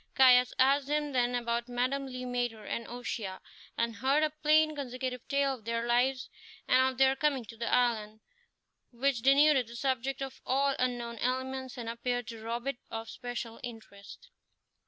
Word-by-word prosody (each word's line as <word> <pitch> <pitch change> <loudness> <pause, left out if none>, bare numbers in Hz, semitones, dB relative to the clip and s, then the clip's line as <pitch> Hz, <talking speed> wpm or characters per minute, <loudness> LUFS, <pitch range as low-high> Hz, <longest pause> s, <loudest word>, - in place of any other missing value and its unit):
Caius 250 -1 +6
asked 275 +1 +4
him 295 0 0
then 245 -1 +1
about 235 0 -1
Madame 255 +3 -1
Le 255 -1 -6
Maître 245 -4 -3
and 235 - -3
O'Shea, 230 -5 -5 0.4
and 230 -2 -1
heard 275 +6 +2
a 305 - +1
plain 310 0 +3
consecutive 255 -2 -5
tale 280 -1 +1
of 245 -4 -10
their 230 0 -1
lives 250 +2 +1 0.4
and 260 +1 +4
of 255 - -13
their 265 0 +4
coming 270 -3 0
to 230 - -11
the 230 +1 -3
island, 220 -3 +1 0.7
which 250 0 0
denuded 275 -1 +5
the 235 - -10
subject 265 +1 -1
of 270 - -8
all 275 +2 +2
unknown 240 -2 -2
elements 260 +1 -2
and 235 -2 -6
appeared 245 +1 -2
to 225 -1 -8
rob 235 +2 -4
it 275 -2 -2
of 225 0 -6
special 240 -2 -6
interest. 225 - -11
250 Hz, 170 wpm, -30 LUFS, 235-270 Hz, 0.7 s, Caius